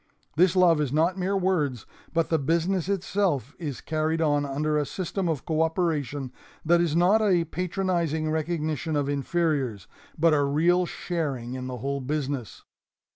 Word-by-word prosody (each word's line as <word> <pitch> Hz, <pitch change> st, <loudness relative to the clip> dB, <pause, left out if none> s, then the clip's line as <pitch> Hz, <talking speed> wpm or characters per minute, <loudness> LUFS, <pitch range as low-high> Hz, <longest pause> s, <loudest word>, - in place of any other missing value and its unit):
This 180 Hz, +3 st, +4 dB
love 175 Hz, -4 st, +5 dB
is 140 Hz, -4 st, -1 dB
not 165 Hz, +5 st, +2 dB
mere 195 Hz, +2 st, 0 dB
words, 155 Hz, -, 0 dB, 0.3 s
but 165 Hz, 0 st, 0 dB
the 160 Hz, -, +2 dB
business 170 Hz, +5 st, 0 dB
itself 185 Hz, -, 0 dB
is 145 Hz, -7 st, -5 dB
carried 155 Hz, +1 st, -1 dB
on 145 Hz, -3 st, +1 dB
under 150 Hz, +2 st, -1 dB
a 150 Hz, -, +2 dB
system 185 Hz, +3 st, -3 dB
of 155 Hz, -6 st, -2 dB
co 160 Hz, -1 st, 0 dB
operation 155 Hz, -5 st, -1 dB, 0.3 s
that 170 Hz, +1 st, +4 dB
is 165 Hz, -3 st, 0 dB
not 185 Hz, +6 st, +4 dB
a 185 Hz, -5 st, +3 dB
patronizing 170 Hz, -3 st, -1 dB
recognition 155 Hz, -1 st, -2 dB
of 145 Hz, -1 st, 0 dB
inferiors, 140 Hz, -, -1 dB, 0.3 s
but 165 Hz, 0 st, +4 dB
a 145 Hz, -, +3 dB
real 170 Hz, +6 st, +2 dB
sharing 140 Hz, -11 st, -3 dB
in 130 Hz, 0 st, -5 dB
the 125 Hz, -1 st, -5 dB
whole 140 Hz, +3 st, -3 dB
business. 135 Hz, -3 st, -3 dB
160 Hz, 160 wpm, -26 LUFS, 145-175 Hz, 0.3 s, love